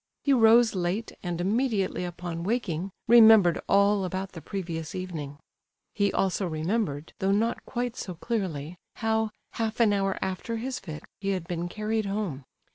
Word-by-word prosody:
He 280 - +3
rose 230 -1 +6
late, 185 +4 -2
and 175 -2 -3
immediately 205 -1 0
upon 175 -1 -5
waking 195 -4 -1 0.2
remembered 220 -6 +7
all 200 0 +4
about 190 +1 -3
the 165 - -9
previous 165 -3 -5
evening; 160 -6 -5 0.6
he 200 -1 +1
also 190 0 0
remembered, 160 -1 -2
though 195 -1 +1
not 225 +4 +1
quite 245 -1 -2
so 180 -7 -6
clearly, 175 - -3 0.2
how, 220 -1 0 0.2
half 225 0 -3
an 220 -3 +5
hour 195 -1 0
after 190 +5 -3
his 255 +3 -3
fit, 160 -5 -8 0.2
he 195 - -2
had 185 -4 -2
been 175 -1 -3
carried 215 +2 -2
home. 195 -10 -3
195 Hz, 155 wpm, -27 LUFS, 175-220 Hz, 0.6 s, remembered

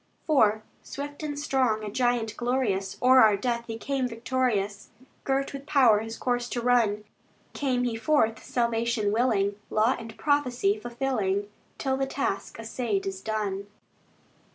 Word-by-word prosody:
IV 220 -8 +3 0.2
Swift 285 +2 -7
and 295 -2 -4
strong, 260 -7 +1
a 210 - -5
giant 240 -2 0
glorious, 240 -6 -1
O'er 255 +1 +7
our 215 -2 +6
death 235 +2 -2
He 225 -1 -5
came 270 +1 -1
victorious, 230 -4 -1 0.4
Girt 275 +1 0
with 275 0 -8
power 250 -8 +5
His 225 +1 -6
course 245 -1 -1
to 245 - -2
run. 230 -4 +2 0.5
Came 255 -3 0
he 240 -2 -1
forth 225 -2 +1
salvation 235 -3 0
willing, 205 -3 +1
Law 220 +5 +2
and 225 -1 -9
prophecy 290 +6 +1
fulfilling, 220 - -2 0.3
Till 265 -1 -1
the 270 0 -1
task 270 -7 -3
assayed 225 -2 -2
is 190 -1 -4
done. 200 -2 -3
235 Hz, 145 wpm, -27 LUFS, 215-260 Hz, 0.5 s, O'er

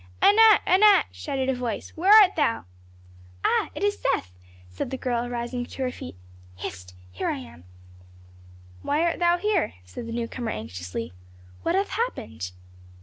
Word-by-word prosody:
"Anat! 440 +1 +6
Anat!" 395 +2 +6
shouted 270 -3 -3
a 265 - +2
voice. 245 -4 -4
"Where 370 +5 +2
art 415 -3 +8
thou?" 290 - 0 0.8
"Ah! - - +2
it - - -4
is 410 0 +1
Seth," 90 -1 -1 0.3
said 90 - -5
the 265 - -4
girl, 245 -2 -2
rising 245 +1 -3
to 260 +2 -6
her 255 - -1
feet. 90 - -9 0.4
"Hist! 90 -1 -8 0.2
Here 90 - -3
am 80 +2 -6
I." - - -21 1.2
"Why 300 +3 0
art 340 -1 0
thou 345 0 +3
here?" 395 - 0
said 90 - -8
the - - -6
newcomer 235 0 -4
anxiously. 105 - -6 0.5
"What 335 - 0
hath 395 +1 +1
happened?" 110 - -3
250 Hz, 155 wpm, -25 LUFS, -, 1.2 s, art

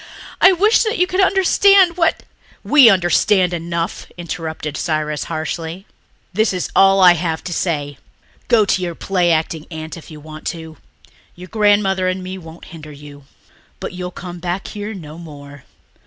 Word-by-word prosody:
I 375 - +8
wish 415 +5 +3
that 445 0 -1
you 360 - +3
could 370 +1 0
understand 385 -1 +4
what...." 330 -2 0 0.4
"We 280 -6 +7
understand 185 0 +2
enough," 170 0 -4
interrupted 160 -3 -6
Cyrus 155 -2 -2
harshly. 165 +3 -5 0.5
"This 215 +2 +1
is 180 - -3
all 195 0 +5
I 180 -1 +8
have 165 -1 -3
to 175 - -5
say. 145 -5 -3 0.5
Go 230 -4 +4
to 190 - 0
your 175 -2 -4
play 180 -2 0
acting 160 -1 -1
aunt 160 0 -7
if 165 - -13
you 155 -2 -11
want 155 +1 -10
to. 160 -2 -7 0.6
Your 180 +1 -12
grandmother 205 -3 +2
and 185 0 -2
me 185 +1 -7
won't 165 -1 -13
hinder 155 -2 -10
you. 145 -1 -13 0.5
But - - -6
you'll 180 0 -5
come 175 -1 -9
back 180 +2 -4
here 210 +1 -6
no 160 -3 -10
more. 145 -4 -12
175 Hz, 165 wpm, -18 LUFS, 160-200 Hz, 0.6 s, I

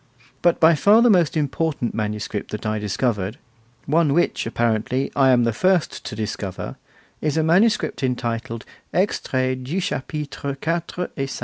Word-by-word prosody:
But 175 - +3
by 165 +1 +7
far 205 +9 +5
the 240 - +6
most 170 -5 +3
important 150 -3 -1
manuscript 105 -1 -3
that 105 - -6
I 110 0 0
discovered, 105 0 -1 0.5
one 155 -1 +2
which, 175 -8 +1
apparently, 120 +3 0
I 135 -1 +5
am 125 -2 +5
the 115 -1 +1
first 185 - +1
to - - -5
discover, 105 -3 -4 0.5
is 150 0 0
a 160 - +3
manuscript 190 +6 +2
entitled 115 -3 -2 0.3
'Extrait 130 -9 0
du 155 +9 -2
Chapitre 145 -5 -4
4 170 +2 -2
et 135 -1 -2
5. - - -5
135 Hz, 150 wpm, -22 LUFS, 115-165 Hz, 0.5 s, by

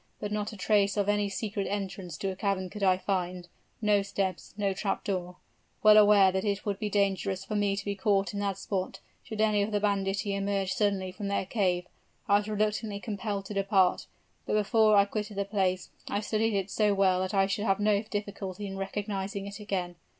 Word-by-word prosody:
But 210 - -4
not 210 +1 -2
a 215 - -10
trace 200 0 +2
of 205 -1 +1
any 205 0 +1
secret 200 0 -3
entrance 190 -4 -4
to 195 +3 -2
a - - -6
cavern 190 -2 -1
could 210 - -8
I 185 -2 +4
find 180 -2 -2 0.4
no 210 -1 +4
steps, 195 -2 -3
no 200 -2 0
trap 195 +1 -2
door! 180 -2 -3 0.5
Well 215 0 +8
aware 205 -2 +7
that 190 0 -1
it 200 -2 -1
would 200 -2 -2
be 215 - -2
dangerous 195 -2 0
for 210 - -4
me 205 -1 +1
to 195 - -5
be 200 - -1
caught 200 0 +1
in 200 - -3
that 200 -2 -1
spot, 195 -1 -3 0.2
should 220 - -8
any 215 -2 +3
of 205 +2 -1
the 205 - +1
banditti 200 0 0
emerge 195 -1 -1
suddenly 200 -3 0
from 200 +2 -5
their 200 -1 0
cave, 185 -4 0 0.4
I 200 - +5
was 205 - -6
reluctantly 210 0 -1
compelled 205 -1 -4
to 210 - -6
depart. 195 -2 +2 0.4
But - - -1
before 215 +1 +4
I 200 - +6
quitted 210 0 -4
the 200 - 0
place, 190 -3 -1 0.2
I 200 - 0
studied 215 0 0
it 195 0 -3
so 210 -2 +2
well 190 -2 +3
that 185 +2 -2
I 195 0 +4
should 200 +2 -2
have 195 -1 +2
no 205 -1 +3
difficulty 205 -2 -5
in 195 -1 -5
recognizing 195 0 -3
it 200 +1 -7
again. 185 -4 -3
200 Hz, 210 wpm, -29 LUFS, 195-210 Hz, 0.5 s, Well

